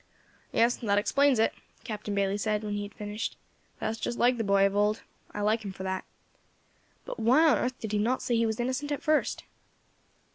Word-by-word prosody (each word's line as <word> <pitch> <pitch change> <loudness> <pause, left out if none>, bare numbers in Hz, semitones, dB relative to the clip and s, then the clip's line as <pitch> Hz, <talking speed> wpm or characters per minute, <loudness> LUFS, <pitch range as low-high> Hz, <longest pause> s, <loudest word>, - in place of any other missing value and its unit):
"Yes, 235 +1 +3
that 205 -3 +1
explains 275 +5 +3
it," 225 - +2 0.3
Captain 210 -3 -4
Bayley 200 0 +1
said, 210 +1 -1
when 210 -1 -3
he 205 - -2
had 205 0 -7
finished; 210 +2 -4 0.4
"that's 220 +1 -3
just 240 - -3
like 245 +1 +3
the 225 - -1
boy 200 -1 +4
of 195 0 0
old. 210 +1 +1 0.3
I 205 - -4
like 215 +2 +1
him 200 - -5
for 190 - -8
that. 190 0 -3 1.0
But - - -6
why 255 +9 +5
on 305 - +4
earth 255 0 -2
did 220 - -5
he 210 - +1
not 240 +5 0
say 240 - +1
he 230 0 +2
was 220 0 -2
innocent 260 +4 -2
at 290 +1 -2
first?" 310 -1 +1
220 Hz, 210 wpm, -29 LUFS, 205-245 Hz, 1.0 s, why